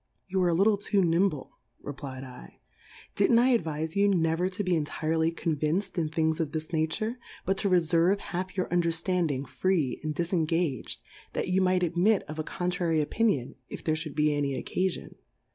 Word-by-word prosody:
You 190 0 -1
are 180 - +3
a 170 - +2
li' 185 - +4
tie - - -19
too 205 -1 +2
iiimble, 170 -3 +1 0.4
r^p^ 130 -2 -8
V - - -28
/, - - -24
did'nt 215 +4 +4
I 250 +2 +5
ad 235 - +2
viic 160 0 -3
you 200 0 +4
never 175 -1 +2
to 195 +2 -3
be 185 - -1
enrirely 160 0 0
conviac'd 165 +4 -1
in 165 -4 0
f'hiiigs 160 0 0
of 155 -3 -2
this 155 +1 -4
nature, 215 +10 -1 0.3
but 195 - +1
to 200 - +1
re 185 - +5
fcrve 170 +3 +3
haU'your 185 0 -3
Underllandiiig 170 -4 +1
free 145 0 0
and 155 -1 -3
difengag'd, 165 - 0 0.4
that - - -2
you 185 +1 +3
might 185 -1 +2
admit 180 +5 +2
of 155 +1 -8
a - - 0
contrary 175 -2 -1
Opinion, 150 - 0 0.2
if - - -7
there 155 - +1
fliould 155 -2 -4
be 150 0 +3
a 145 - 0
ny 140 -2 -1
oc^afion. 185 -1 -2
165 Hz, 190 wpm, -28 LUFS, 155-185 Hz, 0.4 s, I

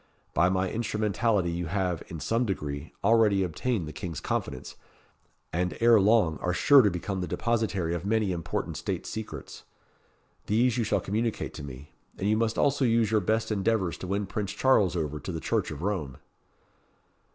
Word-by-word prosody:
By 85 +4 +4
my 95 0 +1
instrumentality 105 -3 0
you 85 0 -3
have, 90 -2 -1
in 85 - -7
some 115 +9 0
degree, 75 -8 -4
already 105 -2 +4
obtained 90 +2 -2
the 75 - -7
King's 80 -1 -5
confidence, 65 - -4 0.8
and 90 +2 -1
ere 115 -1 +6
long 100 -6 +3
are 90 - -1
sure 140 +5 +7
to 105 - +3
become 95 +2 -3
the 90 - -3
depositary 105 -8 -1
of 85 -1 -3
many 105 -1 +1
important 85 -2 -3
state - - -3
secrets. 110 0 -7 0.9
These 120 +3 +2
you - - +2
shall 110 - +1
communicate 110 +3 -2
to - - -8
me. 70 +1 -9 0.3
And 95 - -2
you 105 - +3
must 115 0 0
also 140 -1 +2
use 115 -3 +3
your 110 -1 +3
best 110 +4 0
endeavours 100 -3 +1
to 95 - -6
win 100 +2 -1
Prince 100 0 -3
Charles 105 -9 +3
over 75 -3 -2
to 95 - -6
the 80 - -4
Church - - -1
of 75 +2 -7
Rome." 90 -10 -2
100 Hz, 175 wpm, -28 LUFS, 85-110 Hz, 0.9 s, sure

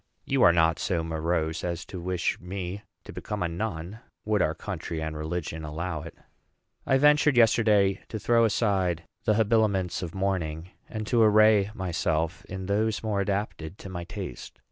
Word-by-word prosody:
You - - +1
are - - +8
not 80 -1 +3
so 85 -3 0
morose 80 0 -1
as 85 -1 -3
to 90 - -7
wish 90 0 -1
me 95 +2 -5 0.2
to - - -10
become 105 -3 -4
a - - +1
nun, 90 +2 -4 0.3
would 105 -2 +2
our - - +1
country 85 - -5
and 80 0 -4
religion 80 0 -4
allow 80 +1 -4
it. 85 - -10 0.7
I 135 - +4
ventured, 150 -1 +4
yesterday, 105 -4 +4
to 110 - -4
throw 115 +2 +3
aside 95 -6 +1 0.2
the 110 -2 +3
habiliments 105 -5 +2
of 85 -1 -6
mourning, 90 -3 -2 0.2
and 110 -1 -4
to 115 +2 +2
array 110 -2 +5
myself 85 -2 -1
in 95 0 -6
those 105 +3 0
more 105 -2 0
adapted 100 -4 -3
to 100 - -9
my 85 -2 -5
taste. 60 - -7
95 Hz, 165 wpm, -27 LUFS, 85-105 Hz, 0.7 s, are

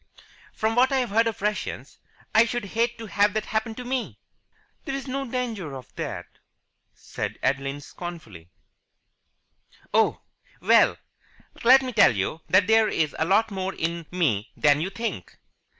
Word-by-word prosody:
"From 220 +1 -1
what 255 +3 +4
I've 255 -5 0
heard 225 +2 +3
of 220 -3 -4
Russians, 210 0 -3 0.3
I 220 - +7
should 240 -1 -3
hate 235 +1 +1
to 225 - -7
have 205 0 +2
that 215 - -1
happen 220 +1 -2
to 250 - -7
me." 255 0 -3 0.7
"There 270 - -3
is 275 0 -5
no 270 0 -3
danger 225 - -3
of 130 -2 -11
that," - - -5 0.7
said - - -6
Adeline 135 +2 -1
scornfully. 140 - -9 1.4
"Oh! - - +2 0.4
Well, - - +4 0.7
let 260 +3 +7
me 255 -1 -4
tell 125 - +5
you 100 +11 -2
that 185 +1 +5
there 220 +1 +4
is 155 -6 -1
a 160 - +2
lot 210 +5 +2
more 190 0 -3
in 165 0 -3
me 140 - 0
than 145 0 +4
you 180 - -1
think." 230 +4 -5
210 Hz, 155 wpm, -25 LUFS, 160-235 Hz, 1.4 s, I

